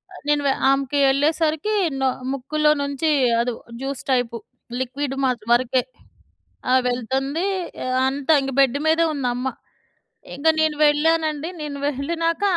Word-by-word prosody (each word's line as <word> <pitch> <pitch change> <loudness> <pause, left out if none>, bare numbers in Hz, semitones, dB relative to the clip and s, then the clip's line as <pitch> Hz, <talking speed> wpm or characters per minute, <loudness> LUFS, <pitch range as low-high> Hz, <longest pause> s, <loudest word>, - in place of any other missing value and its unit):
అ - - -10
నేను 295 0 +2
వె 275 - +4 0.2
ఆమెకి 275 +1 +1
వెళ్ళేసరికి 310 +7 +1 0.3
నొ 265 - +2 0.3
ముక్కులో 300 +3 0
నుంచి 280 +3 -1 0.3
అది 240 +1 0 0.3
జ్యూస్ 270 0 -4
టైపు 245 -2 0 0.4
లిక్విడ్ 260 +2 -3
మా 265 - +3 0.2
వరకే 255 +1 +3 0.9
ఆహ్, 260 0 +5
వెళ్తుంది. 265 +7 -1 0.6
అంతా 275 +2 -1
ఇంక 270 0 -3
బెడ్ 270 -1 +4
మీదే 325 +1 +3
ఉందమ్మ. 250 -3 -2 0.9
ఇంక 285 +4 -2
నేను 315 -1 +1
వెళ్ళానండి. 310 +1 +1
నేను 295 -2 -5
వెళ్ళినాక 330 +6 -1
280 Hz, 125 wpm, -22 LUFS, 260-310 Hz, 0.9 s, ఆహ్